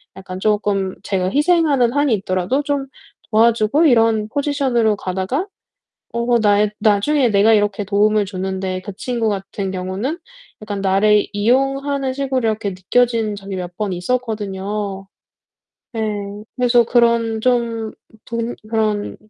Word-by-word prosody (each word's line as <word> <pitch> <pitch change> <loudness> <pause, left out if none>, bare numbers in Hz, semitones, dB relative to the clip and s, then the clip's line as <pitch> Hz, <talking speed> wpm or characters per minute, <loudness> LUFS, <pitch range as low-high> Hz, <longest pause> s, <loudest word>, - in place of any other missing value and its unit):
약간 185 -1 -8
쪼끔 205 -2 0
제가 185 -2 -1
희생하는 295 -5 +3
한이 285 -1 +2
있더라도 185 +6 -1
좀 285 -2 -2 0.5
도와주고 230 +7 +3
이런 225 -5 +3
포지션으로 265 -6 +1
가다가 190 - -2 0.7
어 235 +1 +1
나의 205 0 +3
나중에 230 +6 +2
내가 210 +1 +4
이렇게 205 -1 +1
도움을 210 +1 +2
줬는데 190 -1 -3
그 200 +2 -8
친구 235 -3 -1
같은 195 -1 -3
경우는 190 - -3 0.4
약간 205 -2 -4
나를 200 +2 +3
이용하는 270 +5 0
식으로 260 -4 -1
이렇게 215 -2 -1
느껴진 220 +3 0
적이 195 -1 -7
몇 180 -1 -6
번 205 -3 -2
있었거든요. 200 -1 -3 0.9
예. 225 - -2 0.6
그래서 245 -1 +4
그런 235 -2 +2
좀 230 -2 0 0.3
분 230 +1 -3 0.2
그런 215 -2 -1
215 Hz, 285 characters per minute, -19 LUFS, 200-245 Hz, 0.9 s, 내가